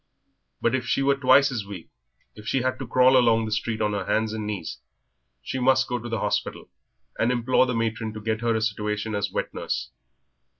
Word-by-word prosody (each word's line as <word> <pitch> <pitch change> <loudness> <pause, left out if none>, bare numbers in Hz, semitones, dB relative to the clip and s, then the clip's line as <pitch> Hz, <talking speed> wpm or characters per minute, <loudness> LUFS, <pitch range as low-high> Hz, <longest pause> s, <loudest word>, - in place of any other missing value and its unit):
But 120 - +1
if 125 -2 -1
she 135 - +1
were 140 0 +4
twice 140 0 +4
as 115 -5 -3
weak, 100 -4 -9 0.4
if 105 0 -12
she 130 -1 0
had 130 0 -1
to 135 - -5
crawl 130 +2 +5
along 115 -3 +4
the 110 - -5
street 110 +1 -2
on 105 - 0
her 100 -2 -2
hands 110 0 0
and 110 -1 -4
knees, 105 -9 -5 0.6
she 130 - -4
must 130 +1 +3
go 125 0 -2
to 120 +1 -7
the 115 -2 -2
hospital - - -2 0.5
and 115 +2 +2
implore 125 +1 +2
the 125 - -1
matron 115 -1 -2
to 110 - -7
get 110 +1 -2
her 115 -1 +1
a 110 - 0
situation 105 0 -2
as 100 0 -1
wet - - -3
nurse. 65 +1 -4
115 Hz, 215 wpm, -25 LUFS, 110-125 Hz, 0.6 s, crawl